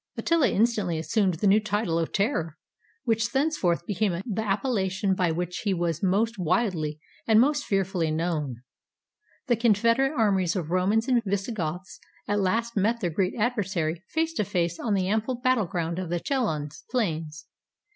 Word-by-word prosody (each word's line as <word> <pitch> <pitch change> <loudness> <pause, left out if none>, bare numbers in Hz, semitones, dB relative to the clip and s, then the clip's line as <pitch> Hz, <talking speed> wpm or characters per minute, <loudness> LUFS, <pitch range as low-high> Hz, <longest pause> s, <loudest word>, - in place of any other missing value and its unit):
Attila 335 -4 +2
instantly 210 -6 +1
assumed 185 +3 +1
this 200 - 0
new 200 +2 +6
title 205 -5 -1
of 165 - -2
terror, 195 - -1 0.5
which 225 -1 +1
thenceforth 265 - 0
became 190 -3 0
the 220 -2 -2
appellation 195 -3 0
by 180 -2 +1
which 175 +2 -2
he 200 -3 0
was 170 -2 -1
most 205 +3 +1
widely 165 -5 0 0.3
and 220 -1 +6
most 290 +4 +2
fearfully 190 -4 0
known. 155 -6 -2 0.8
The 240 - +2
confederate 230 +5 +3
armies 195 -5 +2
of 170 -4 -3
Romans 200 +6 +2
and 250 -3 +3
Visigoths 190 -3 -3 0.3
at 205 0 +1
last 230 +5 0
met 220 +4 +1
their 175 -6 -1
great 185 +3 0
adversary 195 -8 -1
face 325 0 0
to 215 - 0
face 170 -3 -1
on 215 -4 0
the 185 -1 0
ample 220 +5 0
battle 245 -4 +1
ground 170 -1 -2
of 185 -3 -4
the 175 0 -1
Chalons 160 - -2
plains. 160 -10 -2
195 Hz, 160 wpm, -26 LUFS, 170-230 Hz, 0.8 s, new